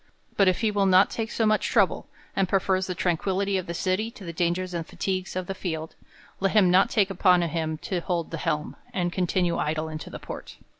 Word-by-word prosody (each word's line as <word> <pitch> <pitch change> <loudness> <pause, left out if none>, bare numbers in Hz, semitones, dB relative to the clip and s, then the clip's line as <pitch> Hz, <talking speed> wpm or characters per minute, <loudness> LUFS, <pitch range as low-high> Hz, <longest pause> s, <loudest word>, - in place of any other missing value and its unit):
But 195 - +4
if 185 - +2
he 220 -2 +2
will 200 -1 +2
not 185 +1 +5
take 225 -1 -3
so 225 - 0
much 215 0 +2
trouble, - - +2 0.3
and 195 -2 +1
prefers 190 -1 +1
the 180 - -3
tranquillity 190 +3 0
of 185 - -7
the 170 - -4
city 185 +6 0
to 215 - -13
the 170 - -5
dangers 175 +2 -1
and 170 -1 -2
fatigues 185 +2 -3
of 185 -1 -2
the 195 - -4
field, 160 -4 -4 0.5
let 195 0 +1
him 195 -5 +5
not 190 +2 +5
take 200 -3 +2
upon 180 -2 +4
him 160 -1 -2
to 185 - -1
hold 170 -1 -2
the 165 - -3
helm, 150 -1 -2 0.2
and 175 -1 0
continue 180 -1 0
idle 155 +1 -1
in 155 0 -5
the - - -8
port. - - -9
185 Hz, 220 wpm, -26 LUFS, 170-195 Hz, 0.5 s, not